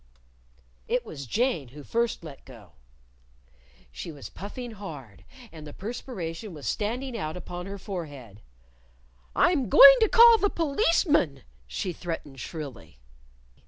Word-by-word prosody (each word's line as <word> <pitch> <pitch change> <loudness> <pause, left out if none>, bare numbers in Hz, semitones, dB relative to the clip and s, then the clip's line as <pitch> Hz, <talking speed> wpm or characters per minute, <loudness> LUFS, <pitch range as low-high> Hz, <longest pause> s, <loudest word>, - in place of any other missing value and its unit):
It 245 0 0
was 140 - -8
Jane 215 - 0
who 145 +4 -12
first 235 +2 -1
let 150 -4 -11
go. 115 -8 -15 1.2
She 65 - -7
was 145 -3 -10
puffing 235 +5 -7
hard, 150 - -10 0.3
and 155 -2 -10
the 145 - -10
perspiration 200 -5 -6
was 145 - -10
standing 240 +4 -2
out 160 -6 -4
upon 180 0 -7
her 200 0 -6
forehead. 145 - -8 0.9
"I'm 275 - +2
going 275 +6 +10
to 440 - +3
call 465 -1 +8
the 405 - +2
Policeman," 305 - +1 0.2
she 175 - -4
threatened 160 -5 -6
shrilly. 140 - -8
180 Hz, 125 wpm, -27 LUFS, 145-245 Hz, 1.2 s, going